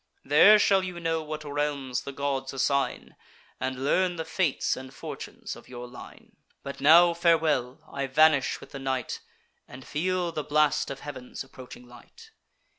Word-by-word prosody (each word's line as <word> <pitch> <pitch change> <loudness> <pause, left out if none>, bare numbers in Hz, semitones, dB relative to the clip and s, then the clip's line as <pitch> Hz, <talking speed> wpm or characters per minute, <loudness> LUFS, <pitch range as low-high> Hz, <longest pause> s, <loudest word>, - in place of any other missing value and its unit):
There 165 +10 +7
shall 195 -2 +3
you 180 -2 -5
know 165 -1 -1
what 155 0 -6
realms 145 -3 -2
the 140 - -7
gods 135 -1 -3
assign, 140 +1 -1 0.4
And 130 0 -3
learn 180 +4 +2
the 160 -1 -4
fates 165 -3 0
and 130 0 -9
fortunes - - -8
of - - -15
your 125 -1 -8
line. 120 - -13 0.3
But 140 - -7
now, 170 +4 +7
farewell! 160 -7 +1
I 140 -1 -4
vanish 150 0 +3
with - - -14
the 140 - -7
night, 130 -2 -3 0.5
And 130 +1 -12
feel 180 +2 -1
the 155 -2 -4
blast 150 0 +2
of 135 -1 -7
heav'n's 130 -4 -7
approaching 130 -2 -13
light." 445 - -16
145 Hz, 160 wpm, -27 LUFS, 130-165 Hz, 0.5 s, There